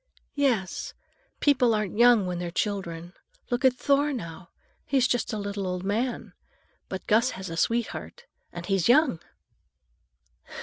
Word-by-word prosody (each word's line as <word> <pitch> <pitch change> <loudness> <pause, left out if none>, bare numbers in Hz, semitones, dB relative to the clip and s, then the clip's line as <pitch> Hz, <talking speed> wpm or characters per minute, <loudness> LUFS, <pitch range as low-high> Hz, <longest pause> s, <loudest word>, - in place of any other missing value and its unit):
"Yes. 245 -10 -1 0.5
People 255 -6 +4
aren't 210 -3 -2
young 235 -3 +5
when 180 -1 -3
they're 175 -1 -3
children. 175 -2 -3 0.4
Look 245 +2 0
at 260 -1 +5
Thor, 285 +2 +2
now; 170 - -7 0.3
he's 265 -3 +2
just 245 -3 -1
a 215 - -3
little 200 -1 -4
old 180 0 -3
man. 225 +6 -2 0.6
But 190 - -6
Gus 230 +4 +3
has 190 -2 -6
a - - -4
sweetheart, 235 - -2 0.3
and 175 0 -7
he's 195 +1 +1
young!" 270 - +4
210 Hz, 140 wpm, -26 LUFS, 185-250 Hz, 0.6 s, young